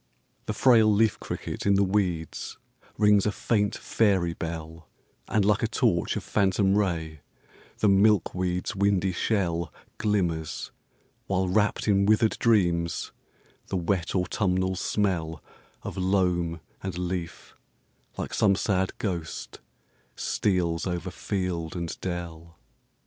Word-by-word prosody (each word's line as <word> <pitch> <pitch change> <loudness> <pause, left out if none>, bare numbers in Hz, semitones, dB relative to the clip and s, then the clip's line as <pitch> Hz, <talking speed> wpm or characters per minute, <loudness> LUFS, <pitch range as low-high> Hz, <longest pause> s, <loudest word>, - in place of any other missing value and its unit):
The 105 - -1
frail 110 -1 +5
leaf 105 +1 +2
cricket - - -5
in 100 - +5
the 100 - +4
weeds 95 -5 -1 0.4
rings 105 -1 +4
a - - +2
faint 105 -1 0
fairy 95 -6 +1
bell; 80 -1 -7 0.4
And 105 -2 +1
like 105 0 +3
a - - +2
torch - - +1
of - - -3
phantom 95 -1 +2
ray 80 -7 -1 0.6
the 105 - +2
milkweed's 95 -2 +2
windy 100 -1 +2
shell 85 -4 -1 0.3
Glimmers; 85 -7 -1 0.6
while 95 -1 +1
wrapped 105 +4 +1
in 100 -1 +3
withered 110 +1 +3
dreams, 85 -7 +1 0.6
the 95 - -2
wet 90 +1 -1
autumnal 95 0 0
smell 85 -5 -1 0.4
Of - - -6
loam 90 -3 +1 0.2
and 95 -2 -4
leaf, 90 -1 -4 0.6
like - - -4
some 100 -2 +3
sad 95 -1 0
ghost, 85 -6 -4 0.6
steals 90 -3 0
over 90 +1 -3
field 90 -6 -3
and 85 -2 -3
dell. 85 -2 -6
95 Hz, 120 wpm, -27 LUFS, 85-100 Hz, 0.6 s, frail